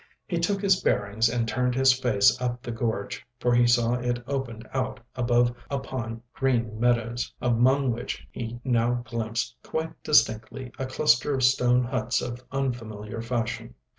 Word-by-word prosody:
He 170 - -2
took 195 +4 0
his 190 -2 +4
bearings 105 +3 +2
and 115 -1 -1
turned 125 +1 0
his 135 0 +6
face 120 -6 +3
up 125 0 -2
the 120 - -4
gorge, 115 -3 -3 0.2
for 120 -2 +2
he 120 0 +5
saw 120 -1 +3
it 120 0 -1
opened 120 -5 -4
out 130 -1 -2 0.2
above 120 0 +2
upon 120 -4 -4
green 120 -5 0
meadows, 120 0 +1
among 125 +2 +3
which 120 +1 -5
he 120 0 -6
now 120 -1 +1
glimpsed 115 -2 -3
quite 160 0 -4
distinctly 120 0 +2
a 130 - -2
cluster 130 +1 +2
of 130 - -1
stone 125 -1 +4
huts 125 -1 0
of 120 +1 -5
unfamiliar 115 -5 -3
fashion. 115 -1 -3
120 Hz, 155 wpm, -26 LUFS, 115-130 Hz, 0.2 s, his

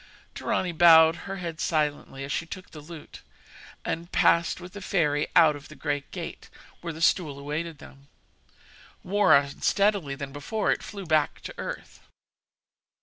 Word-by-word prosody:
Dorani 185 -1 -1
bowed 160 -1 +7
her 195 +2 -7
head 170 -3 -6
silently 150 -3 -1
as 140 - -5
she 165 - -2
took 185 +2 -9
the 155 - -10
lute, 155 +1 -11 0.6
and 170 +2 -4
passed 170 +1 +3
with 180 0 -11
the 205 - -8
fairy 150 -6 +1
out 155 -3 +6
of 145 - -11
the 155 - -13
great 145 -3 -3
gate, - - -7 0.3
where 170 - -4
the 160 0 -9
stool 155 -5 +2
awaited 150 +3 -4
them. 140 0 -15 1.0
More 200 -4 +4
unsteadily 150 +3 0
than 140 0 -6
before, 205 +9 -1
it - - -1
flew 200 -2 -8
back 155 -2 +1
to - - -7
earth. - - -7
160 Hz, 155 wpm, -26 LUFS, 145-175 Hz, 1.0 s, bowed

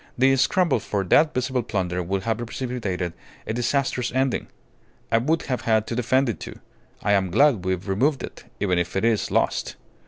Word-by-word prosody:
The 135 +2 +5
scramble 140 +2 +2
for 100 -1 -2
that 150 - +4
visible 130 0 -1
plunder 90 -5 -2
would 95 +2 -2
have 115 0 0
precipitated 115 -8 -3 0.3
a - - -3
disastrous 125 +1 0
ending. 130 0 0 0.6
I 115 - +4
would 155 +7 0
have 125 -2 -2
had 110 -1 +2
to 115 - -4
defend 130 +3 +2
it, 115 - -2
too. - - -8 0.5
I 105 - +2
am 95 -2 +2
glad 110 -1 +3
we've 95 +1 -2
removed 130 +9 +1
it - - -9
even 90 -3 +1
if 85 +1 -3
it 95 - +1
is 115 -3 +1
lost. - - 0
115 Hz, 185 wpm, -24 LUFS, 95-130 Hz, 0.6 s, The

